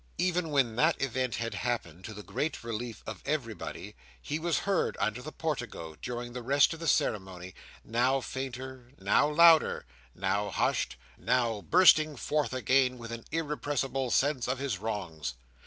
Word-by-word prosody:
Even 180 -2 0
when 130 -6 +1
that 155 +5 +3
event 130 -1 -1
had 115 0 -3
happened, 95 -8 -3
to 110 - -7
the 105 - -8
great 155 +5 -3
relief 115 0 -5
of 110 -4 -7
everybody, 115 - -4 0.2
he 150 +2 -3
was 170 0 0
heard 195 -2 +1
under 110 +3 -1
the 155 - -7
portico, 120 - -4
during 120 -1 -5
the 125 - -5
rest 140 +6 +4
of 165 - -9
the 165 - -4
ceremony, 95 - 0 0.3
now 125 +4 +2
fainter, 130 -1 -6
now 100 +9 +3
louder, 165 +1 +5 0.3
now 100 +2 0
hushed, 95 - 0 0.2
now 115 -3 +1
bursting 155 - +5
forth 150 +3 -1
again 130 0 +2
with 115 -1 -8
an 115 -1 -7
irrepressible 145 -4 -1
sense 135 0 +1
of 130 +1 0
his 135 -1 -2
wrongs. 80 - -4
125 Hz, 155 wpm, -30 LUFS, 110-145 Hz, 0.3 s, louder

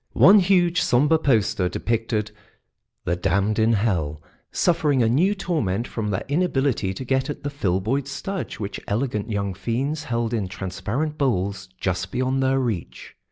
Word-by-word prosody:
One 205 +3 +7
huge, 180 -2 +3
sombre 150 +6 +3
poster 110 - +2
depicted 115 -1 -1 0.7
the 85 - +1
Damned 100 +4 +1
in 110 +1 +4
Hell 85 -9 0 0.3
suffering 150 -7 +2
a - - +3
new 170 - +3
torment 120 - -1
from 110 -2 -3
their 95 - -2
inability 140 - +1
to 130 - -6
get 130 +2 0
at 145 - -5
the 145 - -3
Filboid 115 +3 -1
Studge 195 +7 -4
which 100 -2 -4
elegant 105 -1 -1
young 100 -2 -1
fiends 130 - -2
held 115 -1 -1
in 105 -5 -1
transparent 100 - -3
bowls 100 -7 -1
just 90 0 -2
beyond 130 +1 0
their 130 0 +2
reach. 115 -9 -4
115 Hz, 155 wpm, -23 LUFS, 100-145 Hz, 0.7 s, One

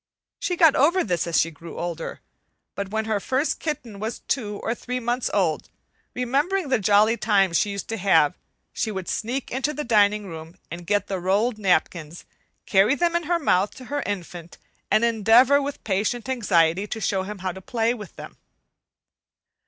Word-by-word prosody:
She 360 - -1
got 325 -4 +5
over 340 +7 +3
this 175 -4 -1
as 170 - +2
she 165 - +1
grew 165 +2 -11
older; 170 -1 -5 0.5
but 200 -1 -5
when 220 +1 -2
her 215 -2 0
first 270 +8 -1
kitten 245 -10 -5
was 220 +3 -4
two 210 -6 -2
or 225 - 0
three 250 +1 -4
months 240 +1 -1
old, 175 -6 0 0.5
remembering 285 +8 0
the 255 -3 +2
jolly 210 +3 +4
times 195 -5 +2
she 210 - 0
used 200 -1 -5
to 225 - -2
have, 165 -7 +3 0.4
she 220 - -2
would 190 -4 -5
sneak 245 +5 -3
into 270 +4 -1
the 300 - -3
dining 210 -3 +3
room 160 -2 -9 0.2
and 170 0 -8
get 205 +2 +1
the 190 -2 -3
rolled 210 +6 0
napkins, 170 -4 -1 0.4
carry 200 +8 +4
them 345 +2 0
in 345 -1 0
her 345 +2 +1
mouth 200 - +1
to 255 - -11
her 290 - 0
infant, 175 -4 -6 0.3
and 220 - +3
endeavor 235 +5 +5
with 280 0 -5
patient 215 +5 -1
anxiety 195 -7 +2
to 220 - -5
show 195 -2 0
him 205 +2 -6
how 185 - 0
to 190 +2 -10
play 230 +3 0
with 210 -7 -10
them. - - -10
210 Hz, 185 wpm, -24 LUFS, 190-250 Hz, 0.5 s, got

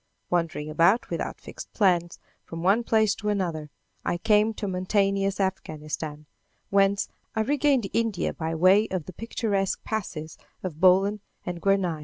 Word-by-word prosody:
Wandering 165 -4 -1
about 170 +9 +3
without - - -3
fixed - - -10
plans, 175 -5 +2 0.3
from 165 0 -7
one 200 +6 +3
place 220 -2 +3
to 210 - -4
another, 170 -7 -2 0.3
I 175 - -1
came 210 +4 +3
to 205 - -4
mountainous 195 +1 0
Afghanistan, 155 -5 -3 0.5
whence 200 0 +3 0.3
I 220 - +1
regained 275 -2 +2
India 225 -5 0
by 160 0 -3
way 190 +6 +5
of 185 -5 -3
the 185 - -9
picturesque 205 -2 -2
passes 165 -8 -5 0.2
of 170 -5 -5
Bolan 195 +3 +4 0.3
and 175 -1 -5
Guernaï. 195 -5 +1
190 Hz, 145 wpm, -26 LUFS, 170-210 Hz, 0.5 s, way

